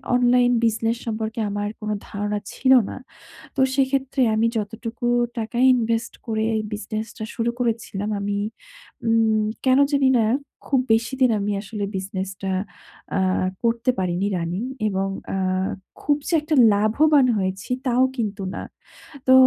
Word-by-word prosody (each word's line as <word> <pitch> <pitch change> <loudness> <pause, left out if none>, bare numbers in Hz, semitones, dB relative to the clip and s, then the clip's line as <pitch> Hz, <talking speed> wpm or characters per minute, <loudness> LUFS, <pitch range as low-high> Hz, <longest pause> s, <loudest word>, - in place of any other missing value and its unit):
Online 245 0 +4
business 225 +1 +1
সম্পর্কে 220 +1 -3
আমার 205 +1 -2
কোন 215 -1 -5 0.2
ধারণা 205 0 -2
ছিল 260 0 +2 0.2
না। - - -6 0.6
তো - - +1
সেইক্ষেত্রে 270 0 +1
আমি 225 +1 +2
যতটুকু 225 +2 -4 0.3
টাকা 230 +2 -3 0.2
ইনভেস্ট 230 -1 0
করে 220 -1 0 0.3
বিজনেসটা 215 +2 -5
শুরু 235 +1 0
করেছিলাম 220 -3 -2
আমি 200 0 -2 0.7
উম 220 -1 +3 0.2
কেন 260 +1 +5
জানি 275 -2 +3
না 225 - +3 0.4
খুব 270 -3 +2
বেশিদিন 245 +3 +2
আমি 205 +1 -1
আসলে 205 0 -5
বিজনেসটা 190 0 -4 0.7
আ - - +2 0.4
করতে 235 +1 +1
পারিনি 185 +2 0
রানিং 175 +6 -2 0.2
এবং 195 -1 0 0.3
আ - - 0 0.6
খুব 290 -1 +2
যে 355 - -2
একটা 305 0 0 0.2
লাভবান 270 +8 +4
হয়েছি 190 +3 -3 0.2
তাও 250 +1 +3
কিন্তু 210 -3 -2
না। - - -4 0.7
তো 260 - +7
225 Hz, 135 wpm, -23 LUFS, 205-245 Hz, 0.7 s, তো